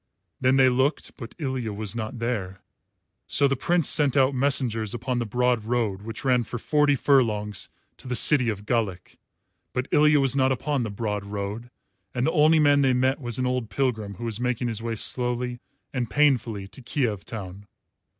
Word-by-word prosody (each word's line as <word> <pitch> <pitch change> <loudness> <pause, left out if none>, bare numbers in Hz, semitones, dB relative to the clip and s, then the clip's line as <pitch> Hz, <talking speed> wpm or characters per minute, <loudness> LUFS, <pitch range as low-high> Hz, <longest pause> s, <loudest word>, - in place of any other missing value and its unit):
Then 130 +1 +3
they 135 -1 +5
looked, 130 +4 0
but 115 -3 -10
Ilya 130 -7 -3
was 105 +1 -4
not 115 +2 -4
there. 110 -6 -3 0.7
So 140 - +3
the 135 - 0
Prince 170 +5 +1
sent 145 -2 +3
out 135 0 +4
messengers 125 -5 +1
upon 120 +1 -2
the 120 - -3
broad 125 0 +1
road 110 -4 -1
which 115 +4 -7
ran 125 -2 +3
for 120 - -6
forty 150 +3 +2
furlongs 105 -8 +1 0.3
to - - -11
the 125 - -2
city 130 -2 +5
of 105 -1 -5
Galich; 105 -7 -2 0.6
but 125 +1 -2
Ilya 150 0 +5
was 135 -1 +1
not 130 -1 +2
upon 140 +1 -1
the 115 - -3
broad 105 -1 -3
road, 100 +3 -5 0.5
and 125 0 0
the 160 - +2
only 155 0 +4
man 145 -2 +4
they 135 -2 +3
met 130 +3 +1
was 120 -3 -3
an 130 - -1
old 125 -3 -2
pilgrim 110 -7 -2
who 120 - -7
was 115 -1 -2
making 125 0 -1
his 110 -1 -3
way 115 0 -3
slowly 125 +1 -1 0.3
and 125 -4 -2
painfully 120 -9 +1
to 130 - -10
Kiev 115 -6 -2
town. 100 -2 -8
125 Hz, 190 wpm, -25 LUFS, 110-135 Hz, 0.7 s, they